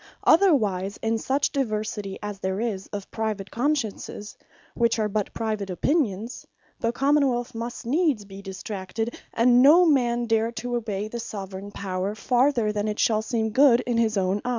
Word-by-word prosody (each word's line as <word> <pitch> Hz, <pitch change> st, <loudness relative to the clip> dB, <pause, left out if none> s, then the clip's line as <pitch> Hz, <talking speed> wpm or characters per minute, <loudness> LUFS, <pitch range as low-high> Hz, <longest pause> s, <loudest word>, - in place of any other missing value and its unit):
Otherwise 210 Hz, -, +3 dB
in 225 Hz, 0 st, +1 dB
such 275 Hz, +4 st, 0 dB
diversity, 215 Hz, -6 st, -2 dB
as 205 Hz, -1 st, -5 dB
there 190 Hz, 0 st, -2 dB
is 215 Hz, -5 st, -3 dB
of 200 Hz, -2 st, -7 dB
private 215 Hz, -3 st, -3 dB
Consciences, 235 Hz, -6 st, -2 dB, 0.4 s
which 235 Hz, -1 st, +1 dB
are 215 Hz, -1 st, +1 dB
but 210 Hz, 0 st, -2 dB
private 215 Hz, -3 st, -3 dB
opinions, 225 Hz, -, -1 dB, 0.4 s
the 230 Hz, -, 0 dB
Common 280 Hz, +3 st, +3 dB
wealth 245 Hz, 0 st, -2 dB
must 235 Hz, +2 st, -6 dB
needs 280 Hz, -, +1 dB
be 195 Hz, 0 st, -10 dB
distracted, 195 Hz, +3 st, -5 dB, 0.2 s
and 245 Hz, +1 st, +4 dB
no 320 Hz, +7 st, +7 dB
man 240 Hz, -6 st, +2 dB
dare 225 Hz, 0 st, +1 dB
to 245 Hz, +1 st, -3 dB
obey 215 Hz, -3 st, -3 dB
the 235 Hz, +2 st, -6 dB
Soveraign 200 Hz, -3 st, -6 dB
Power, 195 Hz, 0 st, -3 dB
farther 245 Hz, -1 st, +2 dB
than 210 Hz, 0 st, -2 dB
it 210 Hz, 0 st, -2 dB
shall 220 Hz, -1 st, +2 dB
seem 220 Hz, -1 st, -1 dB
good 255 Hz, 0 st, +5 dB
in 240 Hz, -2 st, -1 dB
his 220 Hz, -2 st, +1 dB
own 190 Hz, +1 st, 0 dB
eyes. -, -, -3 dB
225 Hz, 170 wpm, -25 LUFS, 205-245 Hz, 0.4 s, no